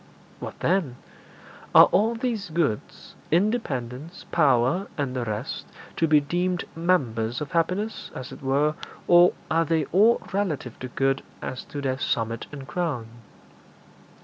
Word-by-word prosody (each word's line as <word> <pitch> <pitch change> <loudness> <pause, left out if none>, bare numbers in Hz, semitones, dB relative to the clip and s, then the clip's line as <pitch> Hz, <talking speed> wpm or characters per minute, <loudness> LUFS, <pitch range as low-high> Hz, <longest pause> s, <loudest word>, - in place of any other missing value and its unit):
'What - - -8
then?' 170 -9 +1 0.8
'Are - - +11
all 225 +3 +3
these 225 -5 -2
goods 155 -10 -2 0.2
independence, 160 - -1
power, 150 +4 +3
and 135 -3 -2
the 125 -2 -1
rest 110 +3 -4 0.3
to 165 - +3
be 155 -1 +6
deemed 175 +4 -1
members 125 -10 0
of 150 -2 -5
happiness, 185 +6 -1
as 130 - -7
it - - -10
were, 140 +3 +2 0.3
or 175 +1 +7 0.2
are 165 +1 +3
they 160 -1 +1
all 215 +6 +5
relative 165 - -2
to 130 - -5
good 135 +2 0 0.2
as 130 - -5
to 145 - -6
their 130 -1 -1
summit 115 -3 -1
and 140 -3 -8
crown?' 145 -11 -2
150 Hz, 140 wpm, -25 LUFS, 130-180 Hz, 0.8 s, Are